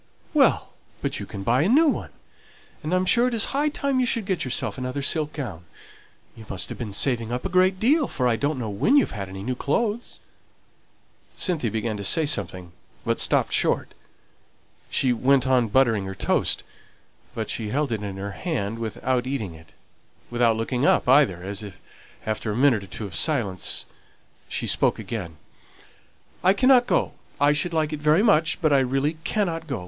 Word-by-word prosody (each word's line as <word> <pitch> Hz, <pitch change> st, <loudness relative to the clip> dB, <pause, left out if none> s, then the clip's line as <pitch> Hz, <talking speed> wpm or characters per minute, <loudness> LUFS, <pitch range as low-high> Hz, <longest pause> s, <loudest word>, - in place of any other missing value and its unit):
"Well, -, -, +3 dB, 0.3 s
but -, -, -2 dB
you -, -, -6 dB
can 95 Hz, -, -7 dB
buy 120 Hz, +6 st, +2 dB
a 170 Hz, -, +2 dB
new 300 Hz, +7 st, +5 dB
one; -, -, -1 dB, 0.7 s
and 155 Hz, 0 st, -4 dB
I'm 185 Hz, 0 st, +2 dB
sure 240 Hz, +6 st, +4 dB
it 245 Hz, -, -1 dB
is 220 Hz, -, +2 dB
high 290 Hz, +2 st, +2 dB
time 280 Hz, -3 st, -1 dB
you 250 Hz, -, +2 dB
should 230 Hz, -3 st, -1 dB
get 190 Hz, -2 st, -1 dB
yourself 130 Hz, +1 st, -2 dB
another 130 Hz, +2 st, -3 dB
silk 150 Hz, +1 st, +1 dB
gown. 105 Hz, -, -6 dB, 0.7 s
You 115 Hz, -, -11 dB
must 95 Hz, -, -3 dB
have -, -, -6 dB
been 115 Hz, -4 st, -5 dB
saving 115 Hz, +1 st, 0 dB
up 125 Hz, +1 st, -3 dB
a -, -, -1 dB
great 185 Hz, +1 st, +3 dB
deal, 280 Hz, -, +3 dB
for 125 Hz, -3 st, -1 dB
I 120 Hz, -, +2 dB
don't 145 Hz, +4 st, -1 dB
know 115 Hz, -4 st, -4 dB
when 100 Hz, -, +2 dB
you've 285 Hz, -, +3 dB
had 100 Hz, -3 st, -6 dB
any 95 Hz, +1 st, -7 dB
new 130 Hz, -, -2 dB
clothes." 215 Hz, -, -2 dB, 1.2 s
Cynthia 160 Hz, -, +1 dB
began 110 Hz, 0 st, -2 dB
to 100 Hz, -, -5 dB
say 160 Hz, +10 st, +2 dB
something, 95 Hz, -, -2 dB, 0.3 s
but -, -, 0 dB
stopped -, -, +2 dB
short. -, -, +1 dB, 1.0 s
She 130 Hz, -2 st, +2 dB
went 130 Hz, +2 st, +2 dB
on 130 Hz, -3 st, +3 dB
buttering 110 Hz, -3 st, +2 dB
her 95 Hz, 0 st, -6 dB
toast, -, -, 0 dB, 0.7 s
but 110 Hz, -1 st, -3 dB
she 110 Hz, -2 st, -3 dB
held 140 Hz, +3 st, -1 dB
it 110 Hz, -2 st, -2 dB
in 100 Hz, -2 st, -5 dB
her 100 Hz, +1 st, -5 dB
hand 115 Hz, -, -3 dB
without 120 Hz, +3 st, -2 dB
eating 115 Hz, -10 st, -3 dB
it; 80 Hz, -1 st, -16 dB, 0.6 s
without 120 Hz, -2 st, +2 dB
looking 120 Hz, +3 st, -2 dB
up 145 Hz, -, +3 dB
either, 125 Hz, -10 st, +4 dB
as, 100 Hz, +2 st, -5 dB, 0.6 s
after 110 Hz, 0 st, -3 dB
a -, -, -3 dB
minute 125 Hz, -5 st, +3 dB
or -, -, -11 dB
two 105 Hz, -, -6 dB
of 95 Hz, -, -8 dB
silence, 110 Hz, -, 0 dB, 0.6 s
she -, -, -2 dB
spoke -, -, +2 dB
again: 90 Hz, -9 st, -6 dB, 1.1 s
"I 185 Hz, +1 st, +5 dB
cannot 250 Hz, +3 st, +4 dB
go. -, -, +1 dB, 0.3 s
I 145 Hz, +1 st, +4 dB
should 150 Hz, +4 st, 0 dB
like 155 Hz, -2 st, 0 dB
it 150 Hz, -, -4 dB
very 150 Hz, +6 st, +3 dB
much; 165 Hz, -7 st, +3 dB
but 155 Hz, -2 st, +4 dB
I 140 Hz, -, +5 dB
really 135 Hz, +4 st, 0 dB
cannot 165 Hz, -5 st, -1 dB
go. 135 Hz, -7 st, -3 dB
130 Hz, 190 wpm, -24 LUFS, 110-165 Hz, 1.2 s, new